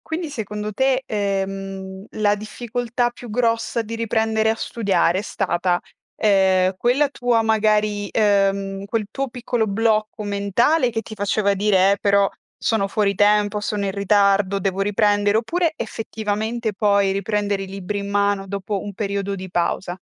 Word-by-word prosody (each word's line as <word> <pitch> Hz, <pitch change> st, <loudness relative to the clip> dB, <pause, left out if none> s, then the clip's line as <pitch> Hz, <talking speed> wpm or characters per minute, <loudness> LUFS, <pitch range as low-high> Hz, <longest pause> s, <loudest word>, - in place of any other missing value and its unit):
quindi 320 Hz, 0 st, -4 dB
secondo 210 Hz, -3 st, -4 dB
te, 265 Hz, +3 st, +1 dB
ehm, 195 Hz, -1 st, -3 dB
la 205 Hz, -1 st, +1 dB
difficoltà 240 Hz, +3 st, -2 dB
più 240 Hz, -1 st, -11 dB
grossa 230 Hz, 0 st, 0 dB
di 225 Hz, +1 st, -7 dB
riprendere 220 Hz, -1 st, +1 dB
a 225 Hz, -, +1 dB
studiare 195 Hz, -6 st, 0 dB
è -, -, -6 dB
stata, 180 Hz, -3 st, 0 dB, 0.4 s
ehm, 190 Hz, -2 st, +3 dB
quella 255 Hz, +7 st, +2 dB
tua 245 Hz, -4 st, +1 dB
magari 215 Hz, -2 st, +1 dB
ehm, 195 Hz, -2 st, +1 dB
quel 215 Hz, 0 st, -2 dB
tuo 275 Hz, +1 st, -3 dB
piccolo 240 Hz, -2 st, -2 dB
blocco 215 Hz, +1 st, 0 dB
mentale 220 Hz, -, +2 dB
che 225 Hz, -, -2 dB
ti 220 Hz, -, -9 dB
faceva 200 Hz, 0 st, +1 dB
dire: 195 Hz, -1 st, +3 dB
"Eh, 200 Hz, -, 0 dB
però 200 Hz, -1 st, +3 dB, 0.3 s
sono 220 Hz, -4 st, +1 dB
fuori 200 Hz, -1 st, +1 dB
tempo, 210 Hz, +1 st, +3 dB
sono 205 Hz, -1 st, -2 dB
in 195 Hz, -, -2 dB
ritardo, 200 Hz, -1 st, +2 dB
devo 195 Hz, 0 st, -2 dB
riprendere;" 205 Hz, 0 st, +2 dB
oppure 335 Hz, +8 st, 0 dB
effettivamente 220 Hz, 0 st, -3 dB
poi 200 Hz, -1 st, +2 dB
riprendere 200 Hz, 0 st, -1 dB
i -, -, -5 dB
libri 195 Hz, +1 st, -5 dB
in 200 Hz, -, -5 dB
mano 200 Hz, -1 st, +1 dB
dopo 200 Hz, 0 st, -3 dB
un 205 Hz, -, -6 dB
periodo 200 Hz, -1 st, -2 dB
di 190 Hz, -1 st, -7 dB
pausa? 175 Hz, +1 st, -1 dB
205 Hz, 155 wpm, -21 LUFS, 195-225 Hz, 0.4 s, ehm